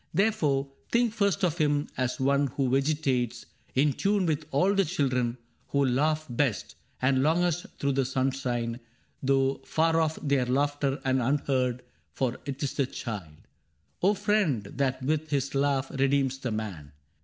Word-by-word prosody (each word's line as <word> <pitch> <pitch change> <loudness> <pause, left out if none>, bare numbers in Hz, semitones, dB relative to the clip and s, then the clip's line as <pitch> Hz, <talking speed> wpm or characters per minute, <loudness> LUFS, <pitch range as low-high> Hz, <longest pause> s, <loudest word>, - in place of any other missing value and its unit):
Therefore 150 -9 +1 0.2
Think 235 -2 +2
first 200 -2 +1
of 175 -1 +1
him 145 -1 +2
as 130 +3 -1
one 140 +1 +2
who 130 0 -1
vegetates 135 -4 0 0.3
In 140 +2 +3
tune 200 +5 +1
with 155 -2 -1
all 180 +9 +3
the 195 -1 +3
children 130 -8 0 0.3
who 140 -1 +2
laugh 150 +5 +1
best 120 -2 -1 0.3
And 130 0 +3
longest 175 +3 +1
through 140 - 0
the 135 -1 +1
sunshine, 130 -3 -1 0.4
though 135 0 +1
far 165 +1 +2
off 160 0 0
Their 140 -4 +1
laughter, 140 +1 0
and 130 -1 +2
unheard; 130 -1 0 0.3
for 130 -2 -1
't 140 +1 -4
is 140 - -1
the 140 -3 0
child, 95 - -7 0.5
O 200 +3 +4
friend, 200 - +1
that 130 -2 -1
with 155 +3 0
his 140 -2 -1
laugh 135 -1 +1
redeems 135 -1 +1
the 130 - -3
man. 100 -10 -5
140 Hz, 155 wpm, -28 LUFS, 130-155 Hz, 0.5 s, O